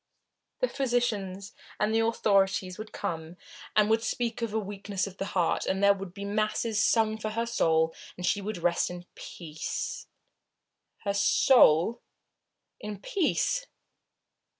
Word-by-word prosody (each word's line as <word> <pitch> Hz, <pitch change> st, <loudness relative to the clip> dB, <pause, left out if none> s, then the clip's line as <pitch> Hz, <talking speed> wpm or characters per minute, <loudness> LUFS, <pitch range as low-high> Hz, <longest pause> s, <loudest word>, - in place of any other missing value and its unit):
The -, -, +3 dB
physicians 220 Hz, -, -1 dB, 0.3 s
and 210 Hz, +1 st, +1 dB
the 225 Hz, -, +3 dB
authorities 195 Hz, -4 st, +1 dB
would 215 Hz, 0 st, -7 dB
come 165 Hz, +1 st, -5 dB, 0.4 s
and 210 Hz, -1 st, +5 dB
would 225 Hz, +1 st, +3 dB
speak 235 Hz, +1 st, -2 dB
of 230 Hz, -2 st, -1 dB
a 220 Hz, -, -1 dB
weakness 200 Hz, -1 st, -3 dB
of 195 Hz, -1 st, -9 dB
the 195 Hz, -, -3 dB
heart, 175 Hz, -2 st, +1 dB
and 190 Hz, +1 st, 0 dB
there 200 Hz, 0 st, +7 dB
would 195 Hz, -2 st, -7 dB
be 200 Hz, +2 st, -7 dB
masses 215 Hz, +1 st, 0 dB
sung 220 Hz, -1 st, +2 dB
for 215 Hz, -, -3 dB
her 230 Hz, +2 st, -1 dB
soul, 160 Hz, -8 st, +2 dB, 0.2 s
and 180 Hz, -, -4 dB
she 200 Hz, -, +1 dB
would 210 Hz, +1 st, -4 dB
rest 170 Hz, 0 st, +1 dB
in 175 Hz, 0 st, -8 dB
peace. 170 Hz, -, -5 dB, 1.0 s
Her 200 Hz, -, 0 dB
soul? 210 Hz, -, +5 dB, 0.8 s
In 210 Hz, -2 st, -6 dB
peace? 400 Hz, -, 0 dB
205 Hz, 145 wpm, -28 LUFS, 185-225 Hz, 1.0 s, there